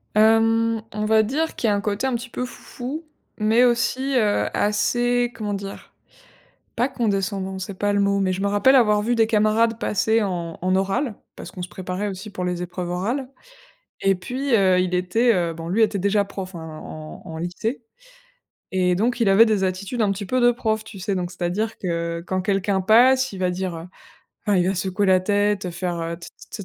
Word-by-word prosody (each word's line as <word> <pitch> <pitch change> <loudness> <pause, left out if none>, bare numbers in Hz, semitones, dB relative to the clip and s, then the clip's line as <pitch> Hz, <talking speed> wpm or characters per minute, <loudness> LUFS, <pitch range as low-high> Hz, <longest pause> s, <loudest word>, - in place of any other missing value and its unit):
Hem, 225 +1 +4
on 210 0 -3
va 220 0 +4
dire 310 +8 -1
qu'il 225 - 0
y - - +3
a - - +2
un - - 0
côté 210 +4 -2
un 260 - 0
petit 240 +1 -5
peu 250 - -3
foufou 270 +5 -7 0.3
mais 220 +3 +3
aussi, 255 +3 +1
heu, 210 -3 +2
assez, 240 +4 +1
comment 210 -2 -4
dire? 195 0 -8 0.8
Pas 245 +3 +2
condescendant, 195 -5 -1
c'est 190 +1 -5
pas 205 +2 0
le 205 - +2
mot, 200 0 +2
mais 190 -1 +1
je 190 - -4
me 200 - +1
rappelle 205 +7 +4
avoir 210 -4 +4
vu 240 +3 0
des 225 -1 +4
camarades 220 +1 +2
passer 220 +2 +1
en 170 -4 -4
en 185 +1 +1
oral- 195 +5 0 0.2
parce - - -9
qu'on 180 - -8
se 175 - -6
préparait 185 +2 -4
aussi 195 +3 -7
pour 185 -2 -5
les 180 -1 -2
épreuves 180 0 -5
orales- 235 +10 -2 0.7
et 195 -1 +3
puis, 250 +7 -1
heu, 185 -3 +4
il 180 0 0
était, 225 +7 +2
heu 170 -3 0
bon 165 +1 -7
lui 220 +4 +3
était 205 -2 +1
déjà 200 +1 +2
prof, 190 -2 -7
hein, 160 -1 -8
en 155 0 -9
en 160 0 -8
lycée 220 +9 -3 0.9
et 180 -1 +2
donc 235 +5 0
il 215 - +3
avait 200 +4 +7
des 205 -3 +1
attitudes 195 +6 -3
un 200 - +2
petit 200 0 -5
peu 255 +5 0
de 245 0 +6
prof, 220 -3 -1
tu 215 -2 -11
sais? 195 +2 -2
Donc 180 -1 -3
c'est-à-dire 185 +5 -2
que 170 -1 -3
quand 185 0 -1
quelqu'un 195 0 0
passe, 255 +5 +5
il - - -7
va 180 -1 +1
dire, 180 -1 -3
heu 165 +2 -8 0.6
enfin 205 -2 +3
il 175 - +2
va 195 - +1
secouer 190 +2 -1
la 185 -1 +5
tête, 205 -1 +1
faire, 175 0 -3
heu: 165 0 -3
«T 170 - -10 0.2
t 200 - -7
200 Hz, 210 wpm, -23 LUFS, 185-225 Hz, 0.9 s, avait